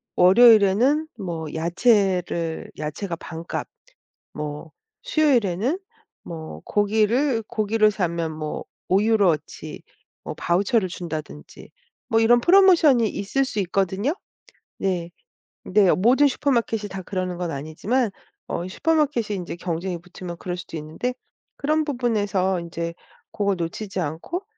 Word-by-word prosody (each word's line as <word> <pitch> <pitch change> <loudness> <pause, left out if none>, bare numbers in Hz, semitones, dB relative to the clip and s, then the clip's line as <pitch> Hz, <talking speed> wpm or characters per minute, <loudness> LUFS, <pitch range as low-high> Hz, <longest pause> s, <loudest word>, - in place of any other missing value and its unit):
월요일에는 230 - +6
뭐 170 -5 -4
야채를 175 -2 +1
야채가 170 +4 -4
반값 165 +1 -6 0.7
뭐 150 +1 -6 0.3
수요일에는 270 - +1 0.4
뭐 160 - -8
고기를 220 +5 +2
고기를 215 0 +2
사면 170 -5 -2
뭐 155 -1 -5 0.3
5 190 +2 +4
유로어치 200 -9 0 0.4
뭐 - - -4
바우처를 190 +3 +1
준다든지 160 -4 -8 0.4
뭐 225 -2 +3
이런 240 +2 +5
프로모션이 340 - +6
있을 270 +7 -1
수 255 - -5
있거든요. 195 - 0 0.6
네. 180 -3 -1 0.6
네 195 -1 +4
모든 255 +9 +4
슈퍼마켓이 240 -5 0
다 190 -1 -6
그러는 185 -1 -3
건 175 -1 -3
아니지만 165 - -1 0.4
어 175 +2 -3
슈퍼마켓이 280 -5 0
인제 175 -2 -5
경쟁이 175 +1 -3
붙으면 175 0 -9
그럴 180 0 -4
수도 170 -1 -8
있는데 160 +11 -3 0.4
그런 310 +2 +1
부분에서 205 - 0
인제 170 0 -5 0.4
고걸 200 -2 0
놓치지 185 +4 -4
않고 170 - -3
195 Hz, 275 characters per minute, -23 LUFS, 170-235 Hz, 0.7 s, 월요일에는